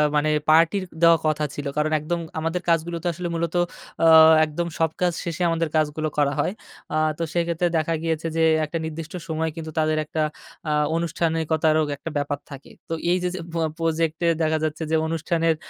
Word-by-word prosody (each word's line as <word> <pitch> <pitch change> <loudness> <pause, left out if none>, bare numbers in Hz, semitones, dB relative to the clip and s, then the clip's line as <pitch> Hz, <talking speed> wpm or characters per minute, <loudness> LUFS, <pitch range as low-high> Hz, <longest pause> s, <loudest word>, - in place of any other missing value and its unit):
মানে 150 +1 +2 0.2
পার্টি 165 +4 +5 0.2
দেওয়া 165 0 +7
কথা 155 0 0
ছিল। 145 - -5
কারণ 150 +1 +1
একদম 170 +3 -2 0.2
আমাদের 165 +3 -2
কাজগুলো 170 +1 +1
তো - - -1
আসলে 175 +1 -4
মূলত 165 +1 -2 0.5
আ - - +5 0.4
একদম 155 +3 -3
সব 165 0 +3
কাজ 180 -1 +3
শেষে 170 0 -4
আমাদের 165 -1 0
কাজগুলো 155 0 0
করা 145 -1 +2
হয়। 180 +6 0 0.4
আ - - 0 0.2
তো 170 - -2
সেক্ষেত্রে 170 0 0
দেখা 160 +1 0
গিয়েছে 165 0 -1
যে, - - +2 0.2
একটা 165 +2 -4
নির্দিষ্ট 160 0 -6
সময় 160 0 -1
কিন্তু 160 -1 -6
তাদের 155 0 +1
একটা 155 +1 -3 0.5
আ - - +1 0.2
অনুষ্ঠানিকতারও 160 -1 +1 0.2
একটা 165 - -6
ব্যাপার 145 0 -2
থাকে। 140 0 -10 0.2
তো 165 - -2 0.2
এই 180 - +3
যে, 180 - +1
যে - - -5
প - - -6 0.2
প্রজেক্টে 165 0 0
দেখা 160 0 +2
যাচ্ছে 155 +1 -2
যে, - - +3
অনুষ্ঠানের 165 0 0
160 Hz, 185 wpm, -23 LUFS, 155-165 Hz, 0.5 s, দেওয়া